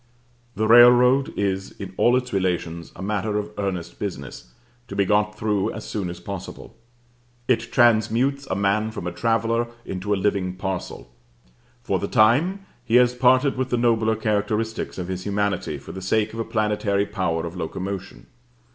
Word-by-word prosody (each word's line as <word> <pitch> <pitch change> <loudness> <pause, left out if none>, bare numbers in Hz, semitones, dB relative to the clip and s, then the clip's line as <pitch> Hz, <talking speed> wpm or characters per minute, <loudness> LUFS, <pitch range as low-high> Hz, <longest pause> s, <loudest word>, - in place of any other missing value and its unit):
The 110 +2 0
railroad 125 +3 +6
is 95 -1 -2
in 95 -1 -8
all 120 +5 +4
its 125 -1 -4
relations 85 -3 -2
a - - -8
matter 105 +1 -1
of 105 0 -4
earnest 90 -4 -4
business, 90 -10 -6 0.4
to - - -7
be 100 - +2
got 105 +1 +1
through 105 -2 0
as 105 - -7
soon 100 -4 -3
as 85 - -7
possible. 100 -3 -8 0.7
It 120 -2 0
transmutes 120 +4 +2
a 95 - -2
man 100 +2 +1
from 110 -5 -7
a 90 - -2
traveller 115 +5 0 0.2
into 95 +2 -4
a - - +4
living 95 -2 -1
parcel. 95 -9 -5 0.7
For - - 0
the - - -3
time 160 - +3 0.2
he 120 -1 0
has 125 0 +5
parted 130 +2 +3
with 130 0 -1
the 120 - +1
nobler 115 -2 +2
characteristics 110 +1 -2
of 90 -2 -4
his 95 0 -4
humanity 100 -6 -1
for - - -10
the 95 - -7
sake 110 +3 0
of 115 - -6
a 115 - -2
planetary 105 -2 0
power 90 -6 -2
of 85 +1 -7
locomotion. 95 +3 -5
105 Hz, 170 wpm, -23 LUFS, 95-115 Hz, 0.7 s, railroad